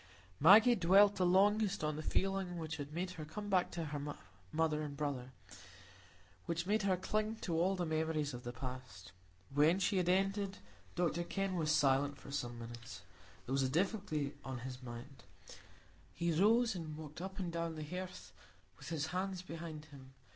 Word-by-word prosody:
Maggie 210 - +8
dwelt 200 +1 +5
the 180 -2 +3
longest 200 +1 +3
on 150 0 0
the 155 - -4
feeling 190 +1 -1
which 160 -1 -4
had 145 -1 -6
made 180 +3 -3
her 160 -4 -7
come 205 +7 -6
back 185 -2 +3
to 170 -2 -4
her 145 -1 -4 0.4
mother 155 -1 +1
and 145 -2 -5
brother, 135 -4 -3 1.2
which 170 +1 -1
made 210 +3 +2
her 190 -2 +2
cling 215 +4 -1
to 185 -6 -4
all 180 +4 +2
the 180 -2 -1
memories 155 -2 0
of 120 0 -7
the 120 - -4
past. 125 -8 -8 0.4
When 150 +5 +5
she 195 +1 +1
had 180 -1 +2
ended, 195 +1 +1 0.4
Dr 175 -1 +1
Kenn 195 +1 -2
was 155 -3 +1
silent 140 -1 +3
for 140 - -11
some 120 -4 -3
minutes; 120 +1 -9 0.4
there 130 - -3
was 135 - +2
a 130 - +1
difficulty 160 - 0
on 130 -2 -5
his 130 0 -6
mind. 125 +2 -9 0.9
He 170 0 0
rose, 220 +8 +4
and 160 -4 -6
walked 155 +1 -8
up 190 +1 -6
and 180 -3 -2
down 170 -1 -2
the 155 - -5
hearth 150 - -7 0.5
with - - -8
his 160 -2 -1
hands 185 0 -2
behind 165 -3 -7
him. 135 -3 -14
160 Hz, 180 wpm, -36 LUFS, 145-190 Hz, 1.2 s, Maggie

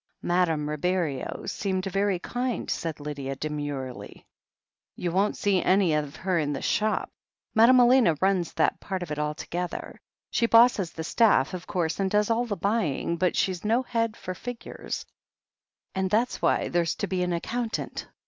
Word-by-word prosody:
"Madame 165 -4 +1
Ribeiro 150 -2 -2
seemed 190 -1 -2
very 195 0 +1
kind," 245 +6 -3
said 160 -3 -3
Lydia 140 -2 -4
demurely. 145 -3 -5 0.7
"You 175 - -2
won't 195 +4 +1
see 195 -3 +2
anything 180 -5 +3
of 140 - -13
her 185 -2 0
in 145 -2 -1
the 135 - -4
shop. 215 0 0 0.4
Madame 235 +3 +7
Elena 240 - +5
runs 190 -2 +1
that 160 - +1
part 190 -2 -4
of 165 - -8
it 150 - -3
altogether. 165 +4 -4 0.3
She 235 - +2
bosses 230 -6 +5
the 160 - -6
staff, 190 - +3
of 180 -1 -6
course, 165 -2 -1
and 195 -1 +1
does 210 +2 +2
all 235 +2 +2
the 205 -4 -3
buying, 180 - 0
but 180 +1 +1
she's 185 -3 0
no 230 +4 +2
head 230 -3 -1
for 185 - -5
figures, 235 +5 -6 0.9
and 190 -1 -1
that's 230 +5 +1
why - - +2
there's 170 -1 +1
to - - -2
be 185 -2 -2
an 180 0 0
accountant. 225 +7 -3
185 Hz, 165 wpm, -27 LUFS, 160-215 Hz, 0.9 s, Madame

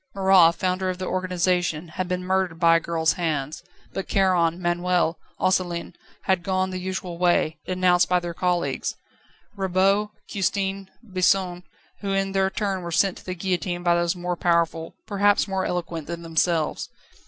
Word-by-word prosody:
Marat, 190 -3 +6
founder 185 0 -1
of 185 - -3
the 185 - -4
organisation, 180 -3 0
had 180 +3 -3
been 180 0 -2
murdered 185 -3 0
by 165 -1 +6
a - - 0
girl's 160 -1 +1
hand; 155 -4 -2 0.3
but 195 - -4
Charon, 180 -3 +2
Manuel, 175 -2 0 0.2
Osselin 180 -2 0 0.3
had 190 -2 +1
gone 185 0 -1
the 185 - -4
usual 185 -2 -5
way, 175 -3 +2
denounced 180 -1 +3
by 180 0 +3
their 175 -1 -5
colleagues, 175 0 -1 0.6
Rabaut, 195 +2 +2 0.2
Custine, 195 0 -2
Bison, 185 -3 +1 0.4
who 200 -1 -2
in 195 0 0
their 195 0 +2
turn 195 -2 -2
were 170 -1 -6
sent 180 +3 +2
to - - -18
the 185 - -3
guillotine 180 -1 -2
by 175 -1 +4
those 170 +1 +1
more 180 0 -3
powerful, 170 -1 0
perhaps 205 0 +2
more 190 -1 -1
eloquent, 170 -3 -3
than 170 0 -6
themselves. 165 -1 0
180 Hz, 160 wpm, -24 LUFS, 170-190 Hz, 0.6 s, Marat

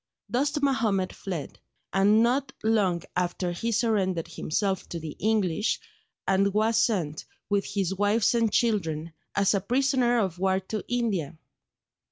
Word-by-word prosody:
Dost 285 +4 0
Mahomed 215 -9 +1
fled; 175 -8 -6 0.3
and 205 +4 +5
not 265 +3 +1
long 200 -6 +2
after 180 0 -1
he 225 +7 -2
surrendered 200 -7 +1
himself 190 +4 -2
to 170 - -4
the 155 -2 -7
English, 210 -2 +1 0.5
and 195 +1 +3
was 225 +1 +3
sent, 165 -9 0 0.3
with 200 -1 +2
his 195 -2 -1
wives 205 +3 +2
and 230 -2 +2
children, 165 -9 0 0.2
as 200 0 +3
a 200 - +1
prisoner 250 +2 +2
of 190 -6 -1
war 190 0 +2
to 205 +3 -5
India. 200 - -1
200 Hz, 140 wpm, -27 LUFS, 185-230 Hz, 0.5 s, and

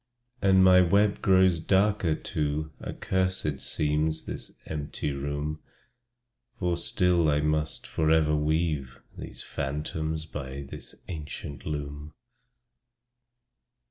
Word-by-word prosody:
And 95 -1 +5
as - - +7
my 90 0 +7
web 100 +3 +3
grows 95 -3 +4
darker 95 -1 +2
too, 75 +1 -2
Accursed 95 -7 -1
seems 75 +1 0
this - - -5
empty 75 -1 -3
room; 70 +2 -3 1.0
For 90 -5 0
still 85 -1 +2
I 75 0 +2
must 75 0 -1
forever 80 -1 +2
weave 75 -4 0 0.2
These - - -5
phantoms 80 +3 -3
by 70 -3 -6
this 70 - -6
ancient 75 -3 -6
loom. 75 0 -5
75 Hz, 105 wpm, -28 LUFS, 75-90 Hz, 1.0 s, as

